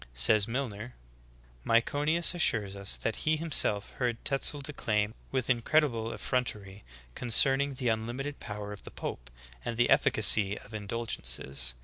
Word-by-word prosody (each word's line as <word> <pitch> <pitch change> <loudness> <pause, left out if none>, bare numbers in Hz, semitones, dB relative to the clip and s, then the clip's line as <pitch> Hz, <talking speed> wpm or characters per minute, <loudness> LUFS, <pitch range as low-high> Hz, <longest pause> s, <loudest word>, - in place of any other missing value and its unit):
Says 105 - +4
Milncr: 120 -2 -4 0.7
"Myconius 145 +9 +2
assures 105 - +1
us 100 -1 -2
that 115 - -2
he 155 0 0
himself 145 -10 +1
heard 120 -3 0
Tetzel 140 +1 +2
declaim 110 -7 -1 0.2
with 130 -2 -1
incredi 140 +4 +2
ble 115 0 -4
effrontery 105 -7 -3 0.3
concerning 135 - +3
the 125 -2 -1
unlimited 120 +6 -3
power 105 -1 -6
of 105 - -11
the - - -10
pope - - -7 0.3
and 115 - -4
the 120 - +2
efficacy 105 -1 +4
of 110 - -12
indulgences. 70 - -2
115 Hz, 135 wpm, -29 LUFS, 105-135 Hz, 0.7 s, Says